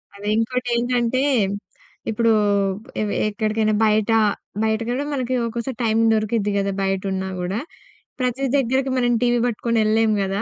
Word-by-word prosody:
అదే 200 +1 -8
ఇంకోటేంటంటే 245 +1 0 0.9
ఇప్పుడు 225 +1 +2 0.7
ఎవె 210 -1 -1 0.2
ఎక్కడికైనా 215 +1 0
బయట 215 +1 +2 0.5
బయటకి 220 +1 0
కూడా 270 +4 -1
మనకి 255 -2 -2
ఒక్కోసారి 235 +2 -4
టైమ్ 225 0 +2
దొరుకుద్ది 215 -1 0
గదా, 200 0 0
బయట 195 0 0
ఉన్నా 190 0 -2
గూడా. 180 +4 -2 0.6
ప్రతి 255 +2 -1
దగ్గరకి 265 +1 +1
మనం 245 -1 +2
టీవీ 240 -1 +2
పట్టుకొని 235 0 -1
ఎళ్ళలేము 215 0 +2
గదా! 195 +1 -1
225 Hz, 135 wpm, -22 LUFS, 215-245 Hz, 0.9 s, ఇప్పుడు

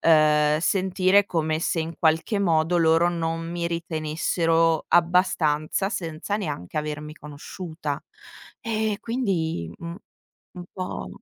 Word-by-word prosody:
ehm, 150 -2 +4
sentire 190 +3 +3
come 160 -3 -1
se 165 - 0
in 165 +1 -4
qualche 165 +6 +2
modo 165 -2 +2
loro 165 +1 +4
non 165 -1 -2
mi 170 0 -2
ritenessero 165 0 0
abbastanza, 170 -1 +2
senza 170 +1 -3
neanche 150 - -4
avermi 150 0 -4
conosciuta. 150 +1 -6 0.6
Eh 220 -4 -1
quindi 175 - -2
mh, 170 0 -7 0.6
un 180 -1 -8
po' 185 -1 -5
165 Hz, 110 wpm, -24 LUFS, 155-180 Hz, 0.6 s, ehm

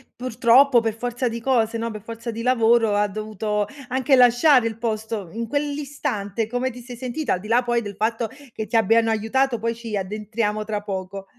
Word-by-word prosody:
purtroppo 250 +2 +4
per 225 -1 -1
forza 245 +2 -2
di 230 0 -4
cose, 230 -3 +1
no, 230 +1 -2
per 215 -2 -8
forza 230 +1 -7
di 230 0 -4
lavoro, 230 -3 +3
ha 205 0 +2
dovuto 210 0 -3 0.2
anche 260 +2 +2
lasciare 250 +1 +5
il 225 -1 -5
posto, 220 -4 -3
in 230 +1 -4
quell'istante, 280 -6 -2
come 245 +3 -2
ti 250 0 -10
sei 245 0 -10
sentita? 255 +3 -2
Al 180 - -1
di 205 - -10
là 240 +3 +3
poi 240 -1 +1
del 205 -3 -7
fatto 225 +2 -1 0.2
che 220 - -5
ti 230 - -4
abbiano 225 +1 +4
aiutato, 235 +4 +1
poi 230 +1 -1
ci 230 -2 -5
addentriamo 210 +2 -2
tra 210 -1 -3
poco. 195 -1 -5
230 Hz, 195 wpm, -23 LUFS, 215-245 Hz, 0.2 s, lasciare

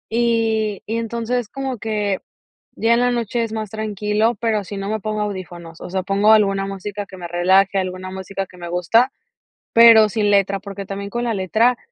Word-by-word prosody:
Y 225 -3 +1
y 225 +2 -2
entonces 230 0 -2
como 265 -4 -4
que 210 -3 -1 0.6
ya 230 +1 +2
en 235 - +3
la 245 0 +2
noche 235 0 -1
es 225 - -4
más 215 -2 -4
tranquilo, 215 +1 0
pero 220 -3 0
si 200 +1 -7
no 195 0 -4
me 220 0 -1
pongo 215 +1 -3
audífonos, 175 -5 -6
o - - -7
sea 190 0 -2
pongo 200 +3 +4
alguna 195 -2 +2
música 200 +1 -5
que 190 - -12
me 175 - -6
relaje, 190 +3 +3
alguna 185 0 -4
música 190 +1 -5
que 180 - -17
me 175 -1 -7
gusta, 225 +9 +2 0.6
pero 230 -2 +8
sin 205 -1 +1
letra, 195 0 +2
porque 200 0 -8
también 200 +1 -6
con 240 +3 -3
la 235 -2 0
letra 220 +6 +2
210 Hz, 195 wpm, -20 LUFS, 195-225 Hz, 0.6 s, pero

